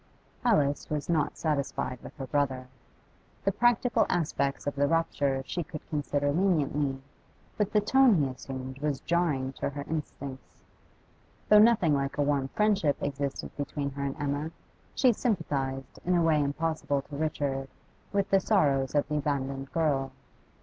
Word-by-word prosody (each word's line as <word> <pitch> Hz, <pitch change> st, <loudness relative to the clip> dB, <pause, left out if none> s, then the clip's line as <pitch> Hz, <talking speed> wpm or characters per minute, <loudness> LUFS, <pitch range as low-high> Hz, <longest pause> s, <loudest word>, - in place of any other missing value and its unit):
Alice 145 Hz, -, +2 dB
was 150 Hz, -1 st, -2 dB
not 155 Hz, -4 st, +1 dB
satisfied 140 Hz, -4 st, -1 dB
with -, -, -11 dB
her 135 Hz, -, -4 dB
brother. 130 Hz, -2 st, -1 dB, 0.8 s
The 195 Hz, -, +4 dB
practical 240 Hz, +2 st, +3 dB
aspects 145 Hz, -5 st, 0 dB
of 145 Hz, -, -1 dB
the 140 Hz, 0 st, +2 dB
rupture 140 Hz, -4 st, +1 dB
she 175 Hz, -, -3 dB
could 160 Hz, -2 st, -9 dB
consider 145 Hz, -1 st, 0 dB
leniently, 150 Hz, -5 st, +1 dB, 0.6 s
but 210 Hz, -1 st, 0 dB
the 210 Hz, -, +3 dB
tone 260 Hz, +1 st, +5 dB
he 145 Hz, -5 st, +2 dB
assumed 130 Hz, 0 st, -7 dB
was 145 Hz, -2 st, -1 dB
jarring 150 Hz, -7 st, 0 dB
to -, -, 0 dB
her 140 Hz, 0 st, -5 dB
instincts. 140 Hz, -3 st, -6 dB, 0.9 s
Though 210 Hz, -, +8 dB
nothing 210 Hz, -8 st, +5 dB
like 140 Hz, 0 st, -1 dB
a 145 Hz, -, +3 dB
warm 140 Hz, -2 st, +1 dB
friendship 195 Hz, -3 st, +2 dB
existed 140 Hz, -1 st, -3 dB
between 145 Hz, 0 st, -3 dB
her 140 Hz, +1 st, -6 dB
and 140 Hz, +1 st, -3 dB
Emma, 145 Hz, +2 st, -1 dB, 0.5 s
she 255 Hz, -3 st, +4 dB
sympathised, 140 Hz, -, -2 dB
in 180 Hz, +1 st, +2 dB
a 170 Hz, -, +3 dB
way 155 Hz, -2 st, +3 dB
impossible 145 Hz, -1 st, -1 dB
to 145 Hz, -, -9 dB
Richard, 140 Hz, -3 st, -1 dB, 0.4 s
with 200 Hz, -1 st, +1 dB
the 195 Hz, -, +6 dB
sorrows 145 Hz, -, +2 dB
of 145 Hz, -, +2 dB
the 150 Hz, 0 st, -1 dB
abandoned 135 Hz, -2 st, -2 dB
girl. 140 Hz, -5 st, 0 dB
145 Hz, 155 wpm, -29 LUFS, 140-170 Hz, 0.9 s, Though